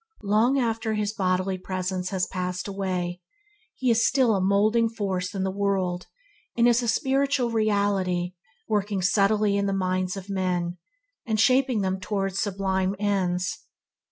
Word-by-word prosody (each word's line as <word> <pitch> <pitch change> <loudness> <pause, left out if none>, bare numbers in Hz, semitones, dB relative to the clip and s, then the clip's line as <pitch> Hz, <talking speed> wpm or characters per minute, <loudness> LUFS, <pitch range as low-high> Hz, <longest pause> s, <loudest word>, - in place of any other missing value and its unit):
Long 220 +7 +3
after 225 -3 0
his 210 0 -1
bodily 185 -1 0
presence 185 0 -3
has 185 -2 0
passed 180 0 -4
away, 185 -3 -3 0.5
he 255 -2 +1
is 230 0 +3
still 255 -4 +3
a 190 - 0
moulding 215 +4 +3
force 195 -4 -3
in 190 - -1
the 190 - -1
world 190 -3 -1 0.5
and 235 0 +5
is 240 0 +4
a 240 - -3
spiritual 270 -1 +1
reality 200 -5 0 0.3
working 205 -3 -1
subtly 200 +1 +3
in 200 0 0
the 195 - 0
minds 185 0 -1
of 195 0 -8
men, 180 -3 -2 0.4
and 220 -3 -1
shaping 255 0 +3
them 190 0 -1
towards 195 0 -2
sublime 190 -1 0
ends. 185 -3 -1
195 Hz, 150 wpm, -25 LUFS, 185-220 Hz, 0.5 s, and